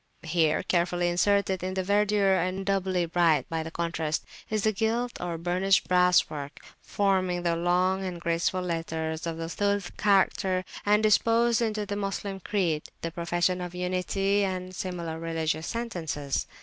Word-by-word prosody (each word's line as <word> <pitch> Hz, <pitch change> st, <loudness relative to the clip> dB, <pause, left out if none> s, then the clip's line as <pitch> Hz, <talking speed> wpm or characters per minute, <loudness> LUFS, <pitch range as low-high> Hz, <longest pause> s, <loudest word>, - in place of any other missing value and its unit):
Here 160 Hz, -1 st, +1 dB
carefully 175 Hz, -1 st, +1 dB
inserted 190 Hz, +1 st, +2 dB
in 185 Hz, +1 st, -3 dB
the 190 Hz, -, 0 dB
verdure, 205 Hz, 0 st, +3 dB
and 185 Hz, +2 st, -1 dB
doubly 190 Hz, -2 st, +1 dB
bright 170 Hz, -2 st, +2 dB
by 160 Hz, -1 st, -2 dB
contrast, 165 Hz, -2 st, -2 dB, 0.2 s
is 215 Hz, -2 st, -1 dB
the 220 Hz, -, +3 dB
gilt 230 Hz, +3 st, -1 dB
or 175 Hz, -2 st, -3 dB
burnished 180 Hz, +3 st, +1 dB
brass 180 Hz, -1 st, +4 dB
work 145 Hz, -1 st, -7 dB, 0.2 s
forming 185 Hz, -3 st, 0 dB
the 170 Hz, -1 st, +1 dB
long 180 Hz, +3 st, +1 dB
and 180 Hz, -2 st, -4 dB
graceful 170 Hz, +2 st, 0 dB
letters 165 Hz, -1 st, -3 dB
of 165 Hz, -1 st, -3 dB
the 165 Hz, 0 st, -4 dB
Suls 200 Hz, +1 st, -1 dB
character, 190 Hz, -2 st, +2 dB, 0.2 s
and 210 Hz, +1 st, +4 dB
disposed 230 Hz, +2 st, +3 dB
into 215 Hz, -2 st, -1 dB
the 205 Hz, -, -3 dB
Moslem 195 Hz, -1 st, -3 dB
creed, 175 Hz, -6 st, -1 dB
the 165 Hz, -, -2 dB
Profession 175 Hz, +2 st, 0 dB
of 180 Hz, 0 st, -6 dB
Unity, 185 Hz, +3 st, 0 dB
and 185 Hz, -1 st, -3 dB
similar 170 Hz, -3 st, -4 dB
religious 160 Hz, -1 st, -2 dB
sentences. 170 Hz, -, -3 dB
180 Hz, 150 wpm, -27 LUFS, 170-195 Hz, 0.2 s, brass